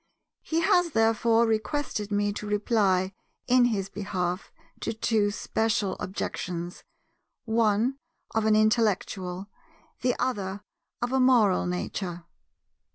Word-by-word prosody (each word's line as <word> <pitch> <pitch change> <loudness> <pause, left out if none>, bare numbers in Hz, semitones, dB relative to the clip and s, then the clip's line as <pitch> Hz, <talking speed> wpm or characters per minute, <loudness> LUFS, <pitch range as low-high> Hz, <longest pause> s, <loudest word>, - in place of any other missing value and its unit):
He 330 +1 -1
has, 340 -1 +3
therefore, 225 +1 +3
requested 220 -1 -1
me 205 0 +1
to 210 0 -6
reply 200 -3 +1 0.3
in 250 0 +5
his 205 -5 0
behalf 185 -2 -3 0.3
to - - -2
two 220 -2 +1
special 210 -1 -1
objections, 180 -2 -4 0.6
one 225 +3 +2 0.3
of 220 -1 +1
an 215 - +5
intellectual, 200 -4 +1 0.5
the 250 0 +1
other 205 -5 -2 0.4
of 240 - -1
a 265 - +2
moral 235 -9 +4
nature. 180 -1 -4
215 Hz, 110 wpm, -27 LUFS, 195-230 Hz, 0.6 s, in